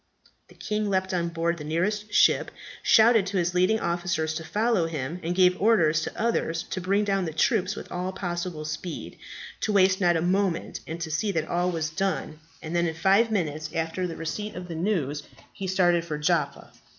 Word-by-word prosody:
The - - -19
king 210 -1 -2
leaped 190 0 0
on 170 -1 0
board 170 0 -1
the - - -6
nearest 205 +7 -1
ship, - - +4 0.3
shouted 220 -2 +5
to 195 - -2
his 175 0 0
leading 185 +5 +3
officers 170 -3 -1
to 165 +1 -4
follow 210 -1 +1
him, 155 +1 -4
and 175 +2 -2
gave 180 -1 +4
orders 170 -8 +4
to - - -5
others 190 -8 0
to 185 - -2
bring 200 +3 +1
down 195 -2 0
the 160 - -4
troops 185 +5 +1
with - - -9
all 180 +1 -3
possible 175 -4 -4
speed, 155 +2 -6 0.4
to 215 - -1
waste 190 -1 +4
not 175 -2 +4
a - - -1
moment, 185 -1 0
and 160 +1 -5
to 160 -1 -4
see 200 +7 0
that 160 -2 -1
all 175 +1 0
was 160 -3 -2
done, 170 -3 -2 0.2
and 160 +2 -4
then, 170 0 +2
in 160 - -3
five 195 +7 +3
minutes 155 -7 -2
after 165 +3 -1
the 165 - -6
receipt 210 +6 -4
of 180 0 -7
the 170 - -6
news 160 -5 -1 0.3
he 195 -2 -5
started 175 -2 +3
for 155 -3 -4
Jaffa. 150 -2 -1
175 Hz, 200 wpm, -26 LUFS, 160-195 Hz, 0.4 s, shouted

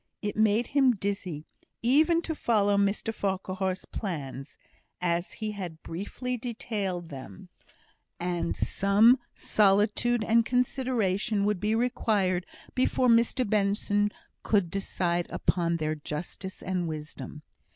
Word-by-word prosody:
It 205 - -2
made 220 +2 +3
him 270 -4 +4
dizzy 190 -6 -3 0.4
even 310 +7 +4
to 325 - -2
follow 205 -8 +2
Mr 200 +3 +1
Farquhar's 190 -2 -2
plans, 140 -8 -5 0.4
as 175 0 -1
he 215 -1 -4
had 180 -6 -7
briefly 240 +8 -4
detailed 205 -7 -3
them; 130 -9 -10 0.7
and 175 -1 -2
some 215 +6 +4 0.2
solitude 210 +3 +2
and 230 +2 +4
consideration 230 -5 0
would 210 -2 +1
be 215 +3 +1
required 205 -6 +1 0.3
before 255 -1 +2
Mr 235 +2 +3
Benson 205 0 +1 0.3
could 200 -6 +1
decide 175 -3 -1
upon 170 -2 0
their 155 -1 -1
justice 155 +5 -6
and 180 -2 -1
wisdom. 150 -1 -7
200 Hz, 115 wpm, -28 LUFS, 175-230 Hz, 0.7 s, him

